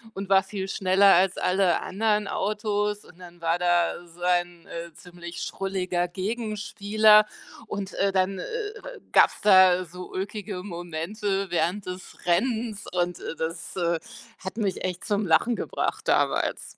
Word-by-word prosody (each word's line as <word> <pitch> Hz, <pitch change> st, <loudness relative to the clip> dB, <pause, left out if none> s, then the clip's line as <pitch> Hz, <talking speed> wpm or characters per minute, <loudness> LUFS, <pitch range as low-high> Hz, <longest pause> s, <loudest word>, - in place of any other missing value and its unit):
und 195 Hz, 0 st, -5 dB
war 195 Hz, 0 st, +6 dB
viel 190 Hz, -1 st, -5 dB
schneller 195 Hz, +1 st, +4 dB
als 185 Hz, +1 st, +3 dB
alle 185 Hz, -2 st, +2 dB
anderen 210 Hz, +1 st, 0 dB
Autos 210 Hz, 0 st, -1 dB
und 180 Hz, -, -18 dB
dann 175 Hz, -1 st, -13 dB
war 165 Hz, +1 st, +1 dB
da 175 Hz, 0 st, +1 dB
sein, 175 Hz, 0 st, -1 dB
äh, 170 Hz, 0 st, -7 dB
ziemlich 175 Hz, -1 st, -9 dB
schrulliger 185 Hz, -2 st, -2 dB
Gegenspieler 215 Hz, +1 st, +2 dB, 0.4 s
und, 195 Hz, -1 st, -5 dB
äh, 195 Hz, 0 st, +1 dB
dann, 190 Hz, 0 st, 0 dB
äh, -, -, -4 dB
äh, 435 Hz, -2 st, -5 dB, 0.2 s
äh, -, -, -13 dB
gab's -, -, +5 dB
da 185 Hz, -2 st, +6 dB
so 180 Hz, +2 st, -10 dB
ulkige 195 Hz, -1 st, -5 dB
Momente 190 Hz, +2 st, -3 dB
während 180 Hz, +4 st, 0 dB
des 180 Hz, +1 st, -9 dB
Rennens 220 Hz, +3 st, 0 dB
und, 180 Hz, 0 st, -1 dB
äh, -, -, -6 dB
das, 165 Hz, +1 st, -4 dB
äh, 170 Hz, -2 st, 0 dB, 0.4 s
hat 190 Hz, +4 st, -7 dB
mich 200 Hz, -4 st, -1 dB
echt 180 Hz, -1 st, -3 dB
zum 205 Hz, -2 st, 0 dB
Lachen 230 Hz, +9 st, +3 dB
gebracht -, -, -3 dB
damals. -, -, 0 dB
190 Hz, 150 wpm, -26 LUFS, 175-205 Hz, 0.4 s, war